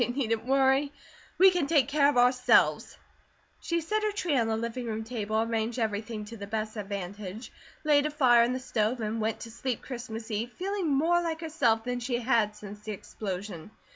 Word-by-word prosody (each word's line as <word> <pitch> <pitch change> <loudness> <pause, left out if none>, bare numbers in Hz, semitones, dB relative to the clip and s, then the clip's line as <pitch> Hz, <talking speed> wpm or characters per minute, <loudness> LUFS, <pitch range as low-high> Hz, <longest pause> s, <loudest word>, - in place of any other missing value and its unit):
They - - +3
needn't 240 -3 -1
worry, 270 +1 +3 0.5
we 380 +2 +7
can 350 -6 0
take 295 -4 +3
care 285 0 +4
of 290 - 0
ourselves." 250 +1 +3 0.6
She 335 0 -1
set 430 +7 -1
her 425 0 0
tree 360 -7 -1
on 230 -4 +2
the 220 0 0
living 235 +2 -4
room 220 0 -3
table, 220 -2 -2
arranged 225 +1 -1
everything 215 -1 -2
to 230 +2 -9
the 200 -1 -7
best 215 +1 -3
advantage, 200 +1 -6 0.3
laid 295 -1 +4
a - - -3
fire 255 -5 +5
in 235 +1 +2
the 255 - -2
stove, 240 -1 -1
and 220 0 -2
went 220 0 -1
to 230 - -8
sleep 245 +1 -3
Christmas 235 -3 -7
eve, 220 +3 -2
feeling 385 -1 -2
more 320 +5 +3
like 325 -1 -3
herself 265 -9 +1
than 245 0 -2
she 245 0 -1
had 230 -4 +1
since 210 0 -10
the 215 0 -6
explosion. 190 -3 -6
235 Hz, 200 wpm, -28 LUFS, 220-280 Hz, 0.6 s, we